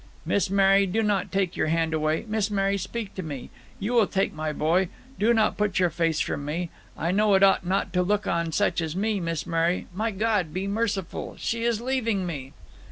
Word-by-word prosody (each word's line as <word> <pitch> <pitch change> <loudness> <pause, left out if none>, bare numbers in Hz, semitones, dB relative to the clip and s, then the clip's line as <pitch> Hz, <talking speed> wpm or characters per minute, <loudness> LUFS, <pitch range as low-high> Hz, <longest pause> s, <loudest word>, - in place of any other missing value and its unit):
Miss 200 - +1
Mary! 195 0 +4
do 220 +5 0
not 205 -3 0
take 190 -3 0
your - - 0
hand 165 0 +1
away! 155 0 0
Miss 215 -1 0
Mary, 195 -1 +1
speak 205 +2 -5
to 190 - -5
me! 145 -7 -7 0.3
You 210 +5 -2
will 230 -4 +4
take 195 0 0
my 155 0 -3
boy? 170 +5 +1 0.3
Do 220 +3 +4
not 220 -2 +2
put 210 -3 0
your 180 -2 +3
face 165 -1 0
from 145 - -2
me. 165 +4 -3 0.3
I 170 - 0
know 205 +1 +4
it 190 - +4
ought 195 -2 +4
not 190 0 0
to 180 - +3
look 205 +3 +1
on 170 -1 0
such 205 0 +1
as 160 0 -3
me. 210 +1 0
Miss 165 -2 -2
Mary! 170 +1 0
my 215 +5 -1
God, 200 -6 0
be 190 +1 -1
merciful! 200 -3 -2
she 230 0 -2
is 235 -2 +1
leaving 230 -6 0
me!" 140 -6 -5
195 Hz, 215 wpm, -26 LUFS, 165-210 Hz, 0.3 s, Mary